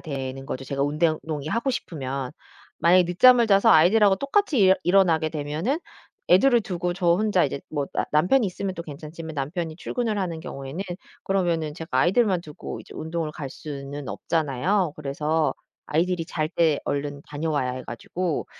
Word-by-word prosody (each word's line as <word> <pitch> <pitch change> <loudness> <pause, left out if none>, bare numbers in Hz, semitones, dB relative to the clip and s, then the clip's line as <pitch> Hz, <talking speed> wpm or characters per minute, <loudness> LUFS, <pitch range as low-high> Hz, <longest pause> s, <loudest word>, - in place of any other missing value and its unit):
되는 135 -2 -5
거죠 130 - -5
제가 140 +1 -2
운댕 155 +2 +1
운동이 150 -2 -5
하고 230 +8 0
싶으면. 135 - -4 0.5
만약에 180 +2 +6
늦잠을 240 +6 +6
자서 195 0 +5
아이들하고 195 +5 +6
똑같이 290 - +1
일 190 -1 +6
일어나게 175 -4 +3
되면은 155 - -2 0.5
애들을 235 +7 +6
두고 180 -3 -2
저 175 -1 -1
혼자 205 -1 +2
이제 140 -1 -3
뭐 145 -3 -2
나 - - 0
남편이 190 - +3
있으면 190 +1 -3
또 170 - -6
괜찮지만 155 +2 -8
남편이 160 +3 -3
출근을 225 +3 -2
하는 175 -4 -2
경우에는 140 +3 -6 0.4
그러면은 170 -6 0
제가 160 0 -8
아이들만 190 - +3
두고 150 -3 -8
이제 - - -14
운동을 160 -1 -3
갈 140 -3 -6
수는 140 -1 -7
없잖아요. 160 +4 0
그래서 150 0 -1 0.3
아이들이 170 +2 0
잘 155 -2 -2
때 160 -3 +2
얼른 145 0 -3
다녀와야 145 -3 -1
해 130 - -6
가지고 170 +8 -3
160 Hz, 380 characters per minute, -24 LUFS, 145-185 Hz, 0.5 s, 만약에